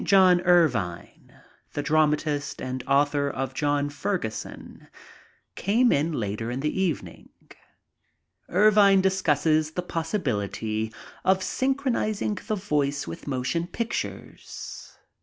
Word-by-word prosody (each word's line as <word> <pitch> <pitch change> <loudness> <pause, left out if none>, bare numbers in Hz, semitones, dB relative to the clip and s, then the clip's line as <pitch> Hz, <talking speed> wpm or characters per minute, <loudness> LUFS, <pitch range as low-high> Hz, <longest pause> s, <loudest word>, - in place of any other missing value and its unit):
John 185 -3 +5
Ervine, 125 - +1 0.4
the 145 - -2
dramatist 150 -1 +1
and 130 0 -4
author 140 +1 +2
of 135 -1 -4
John 145 +1 0
Ferguson, 145 - -5 0.7
came 235 +6 +2
in 150 +4 +1
later 110 -4 -3
in 125 +2 -3
the 150 +6 -1
evening. 175 -7 -3 1.2
Ervine 200 0 +5
discusses 160 -4 +2
the 180 - -2
possibility 110 - -2 0.3
of 190 0 +3
synchronizing 235 -4 -1
the 215 - 0
voice 145 -7 -1
with 85 - -8
motion 140 +6 -1
pictures. 230 +6 -6
155 Hz, 100 wpm, -26 LUFS, 135-190 Hz, 1.2 s, John